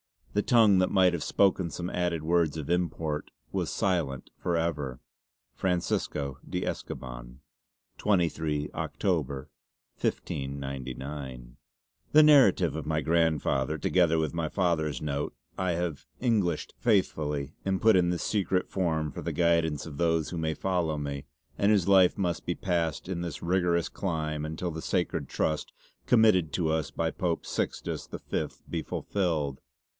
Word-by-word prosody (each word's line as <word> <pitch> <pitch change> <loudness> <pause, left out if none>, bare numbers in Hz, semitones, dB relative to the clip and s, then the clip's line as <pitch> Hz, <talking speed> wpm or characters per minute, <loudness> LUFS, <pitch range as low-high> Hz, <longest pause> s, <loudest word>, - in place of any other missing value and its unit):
The 105 - +3
tongue 110 -4 +5
that 90 - +3
might 95 -2 +5
have 85 - -2
spoken 95 -3 +2
some 90 +2 -4
added 85 -3 -1
words 80 -2 +2
of 75 -2 -5
import 80 -3 -1 0.2
was - - -1
silent 80 -9 -1
for 85 - 0
ever 75 -6 -2 0.6
"FRANCISCO 75 -6 -1
DE - - -2
ESCOBAN." - - -6 0.6
"23, 80 -6 +1
October, 70 +1 -2 0.5
1599." 65 -1 -4 0.6
"The 155 +1 +9
narrative 135 - +6
of 80 - -4
my 80 0 +1
grandfather, 80 -3 +1
together 85 +1 +3
with 80 -2 0
my 85 -2 -1
father's 80 -6 0
note 70 -3 -2 0.2
have 85 -4 -1
I - - -6
Englished 100 -9 +1
faithfully 75 - +1
and 95 -1 0
put 110 -3 +6
in 90 -1 +3
this 90 -1 -1
secret 95 -3 0
form 80 -5 0
for - - -7
the - - -3
guidance 85 -4 +2
of 75 -4 -8
those 80 -2 +1
who 85 - -5
may 80 -1 0
follow 85 -4 0
me, 70 -1 -4 0.3
and 100 +1 +4
whose 100 -3 +3
life 95 -2 +6
must 90 -4 -1
be 90 - -1
passed 85 -4 -1
in 90 -2 -3
this 85 -4 -5
rigorous 85 -1 +1
clime 75 -5 -2
untill 80 +3 -3
the 80 0 -5
sacred 90 -1 -1
Trust 75 -1 -1 0.3
committed 110 -9 +5
to 85 -3 +1
us 80 -1 0
by 80 -1 -1
Pope 85 -5 -2
Sixtus - - -3
the - - -6
Fifth - - -4
be 85 - -2
fullfilled. 80 -6 -1
80 Hz, 150 wpm, -29 LUFS, 75-90 Hz, 0.6 s, The